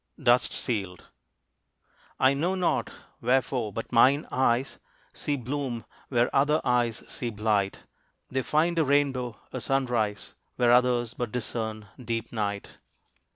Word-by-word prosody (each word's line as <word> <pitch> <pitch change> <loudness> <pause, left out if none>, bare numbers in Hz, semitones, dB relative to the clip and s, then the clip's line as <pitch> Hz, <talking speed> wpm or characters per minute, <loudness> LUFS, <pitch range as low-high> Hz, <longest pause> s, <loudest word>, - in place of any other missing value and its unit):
DUST 125 -3 +3
SEALED. 95 -7 -3 1.2
I 130 +1 +5
know 170 +7 0
not 185 -2 0 0.3
wherefore, 125 -2 +1
but 115 +3 -6
mine 135 +5 +5
eyes 130 0 +1 0.3
See 145 -1 -2
bloom, 130 -2 -4 0.2
where 120 -2 +1
other 150 +3 +4
eyes 120 -2 +1
see 120 - -3
blight. 105 -2 0 0.5
They 130 +1 -1
find 165 +5 +1
a - - +4
rainbow, 135 -5 +1 0.2
a - - -3
sunrise, 120 -6 -1 0.2
Where 120 -1 +3
others 120 -1 +3
but 120 -3 -4
discern 110 -3 -4 0.2
deep 115 -1 -3
night. 100 -3 -2
125 Hz, 125 wpm, -27 LUFS, 115-135 Hz, 1.2 s, I